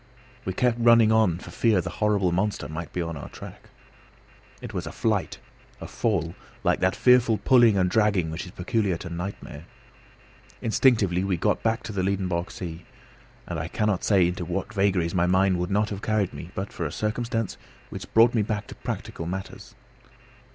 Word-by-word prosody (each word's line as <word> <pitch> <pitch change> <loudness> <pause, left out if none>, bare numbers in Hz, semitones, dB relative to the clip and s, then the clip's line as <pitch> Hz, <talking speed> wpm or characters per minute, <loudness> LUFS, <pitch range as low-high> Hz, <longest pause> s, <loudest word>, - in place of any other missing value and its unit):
We 95 - -2
kept 120 +3 +1
running 115 -2 +6
on 110 -7 +3
for - - -11
fear 110 -5 +2
the 90 - -3
horrible 105 -4 +1
monster 95 +4 -1
might 80 +1 -6
be 90 - -2
on 85 -1 -5
our 70 - -8
track. - - -11 0.9
It - - -8
was - - -4
a - - -5
flight, - - -1 0.4
a - - -7
fall, 85 -8 -1 0.3
like - - +2
that 95 -1 +1
fearful 125 -3 +4
pulling 120 -5 +5
and 90 -1 +3
dragging 100 -5 +2
which 80 +4 -5
is - - -10
peculiar 95 0 -1
to 85 - -8
nightmare. 85 -3 -6 0.9
Instinctively 110 -6 +2
we 95 -2 0
got - - 0
back 115 +2 0
to - - -6
the 100 -2 -2
Liedenbrock 95 -2 -1
sea, 85 -2 -7 0.6
and 85 -3 -4
I 80 - -3
cannot 105 0 -1
say 95 -5 +4
into 90 +1 -3
what 95 +4 -4
vagaries 95 -4 +1
my 90 -1 +2
mind 95 0 +3
would 90 0 -2
not 105 +2 +1
have 100 -1 -5
carried 110 -4 0
me 70 +4 -8
but 95 +1 -4
for 85 - -3
a - - -7
circumstance 115 - -2 0.3
which - - -8
brought 115 +1 +6
me 115 - +2
back 105 0 -2
to - - -7
practical 85 - -5
matters. 95 +2 -7
95 Hz, 185 wpm, -25 LUFS, 85-110 Hz, 0.9 s, running